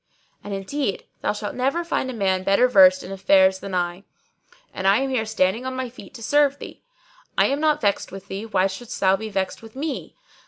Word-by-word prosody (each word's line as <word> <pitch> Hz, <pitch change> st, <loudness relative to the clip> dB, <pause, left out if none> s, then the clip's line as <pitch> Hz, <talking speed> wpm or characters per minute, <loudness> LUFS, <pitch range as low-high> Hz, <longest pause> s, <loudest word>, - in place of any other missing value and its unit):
And 205 Hz, -, -7 dB
indeed 200 Hz, +4 st, -3 dB, 0.2 s
thou -, -, +1 dB
shalt 210 Hz, 0 st, -5 dB
never 275 Hz, +7 st, 0 dB
find 330 Hz, -6 st, -2 dB
a -, -, -4 dB
man 190 Hz, -4 st, 0 dB
better 195 Hz, +6 st, +4 dB
versed 190 Hz, -5 st, +6 dB
in 185 Hz, -, -8 dB
affairs 190 Hz, 0 st, +4 dB
than 195 Hz, -1 st, -5 dB
I, 175 Hz, +1 st, -2 dB, 0.7 s
and 190 Hz, -, -2 dB
I 195 Hz, +2 st, +5 dB
am 270 Hz, +1 st, -1 dB
here 225 Hz, -4 st, -1 dB
standing 220 Hz, +1 st, +1 dB
on 260 Hz, 0 st, -4 dB
my 255 Hz, -1 st, -3 dB
feet 255 Hz, -, -13 dB
to 230 Hz, -, -9 dB
serve 285 Hz, +2 st, +3 dB
thee. -, -, -10 dB, 0.6 s
I -, -, +5 dB
am 280 Hz, +1 st, 0 dB
not 305 Hz, -1 st, +2 dB
vexed 200 Hz, -2 st, 0 dB
with 195 Hz, 0 st, -10 dB
thee: 200 Hz, +3 st, -6 dB
why 190 Hz, -4 st, +2 dB
shouldest 195 Hz, +5 st, -5 dB
thou 190 Hz, 0 st, +4 dB
be 220 Hz, +2 st, -6 dB
vexed 190 Hz, -2 st, -3 dB
with 225 Hz, 0 st, -14 dB
me? 290 Hz, +2 st, -5 dB
205 Hz, 220 wpm, -23 LUFS, 190-260 Hz, 0.7 s, versed